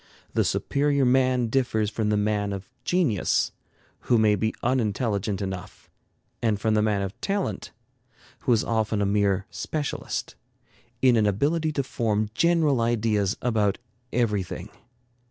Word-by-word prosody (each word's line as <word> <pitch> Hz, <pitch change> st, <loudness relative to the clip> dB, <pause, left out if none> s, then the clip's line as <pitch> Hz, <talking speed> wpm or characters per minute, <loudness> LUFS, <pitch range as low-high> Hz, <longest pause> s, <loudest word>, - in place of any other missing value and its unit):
The -, -, +2 dB
superior 140 Hz, -1 st, +1 dB
man 130 Hz, -1 st, +3 dB
differs 110 Hz, -3 st, 0 dB
from 110 Hz, -1 st, -1 dB
the 105 Hz, -, +2 dB
man 105 Hz, -1 st, 0 dB
of 95 Hz, -1 st, -6 dB, 0.2 s
genius, 160 Hz, -, +1 dB, 0.5 s
who 120 Hz, -, +2 dB
may 110 Hz, -1 st, +4 dB
be 110 Hz, +2 st, 0 dB
unintelligent 105 Hz, -4 st, 0 dB
enough, 95 Hz, -2 st, -7 dB, 0.5 s
and 110 Hz, -3 st, +1 dB
from 110 Hz, 0 st, +1 dB
the 105 Hz, -, +3 dB
man 105 Hz, -2 st, +1 dB
of 95 Hz, 0 st, -6 dB
talent, 195 Hz, -, -2 dB, 0.7 s
who -, -, 0 dB
is 115 Hz, -2 st, +3 dB
often 110 Hz, -2 st, 0 dB
a -, -, +1 dB
mere 100 Hz, -1 st, +1 dB
specialist, 150 Hz, -2 st, -3 dB, 0.7 s
in 125 Hz, -2 st, +6 dB
an 105 Hz, -1 st, +3 dB
ability 155 Hz, -, +1 dB
to 140 Hz, -, 0 dB
form 110 Hz, -5 st, -1 dB
general 160 Hz, -4 st, +3 dB
ideas 110 Hz, -3 st, +1 dB
about 110 Hz, -5 st, +1 dB, 0.3 s
everything. 105 Hz, -5 st, -1 dB
110 Hz, 135 wpm, -25 LUFS, 105-125 Hz, 0.7 s, in